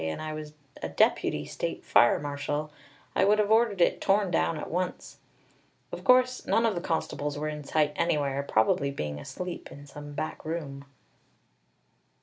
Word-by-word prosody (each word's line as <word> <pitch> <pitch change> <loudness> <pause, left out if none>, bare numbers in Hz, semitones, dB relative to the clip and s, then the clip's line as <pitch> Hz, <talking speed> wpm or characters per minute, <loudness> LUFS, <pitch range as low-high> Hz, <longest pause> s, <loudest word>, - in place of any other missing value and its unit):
and 80 0 -3
I 155 0 -4
was 155 -1 -7 0.3
a 80 - -3
deputy 75 -2 +2
state - - -4
fire 120 - +5
marshal, 145 +1 -3 0.4
I - - +4
would 210 +2 +4
have 210 0 +1
ordered 220 -4 +3
it - - +3
torn 195 -1 +2
down 165 -1 +1
at - - -6
once. 180 +2 -3 0.7
Of - - -7
course 255 0 +4
none 230 - +3
of 225 - +2
the 175 - -3
constables 150 -3 -2
were 150 +1 -2
in 150 -1 -6
sight 150 +1 +1
anywhere, 145 -5 0
probably 140 +1 +2
being 75 - -4
asleep 180 - -6
in 145 +1 -11
some 145 +1 -10
back 155 +2 -4
room! 145 -4 -5
150 Hz, 165 wpm, -28 LUFS, 140-180 Hz, 0.7 s, fire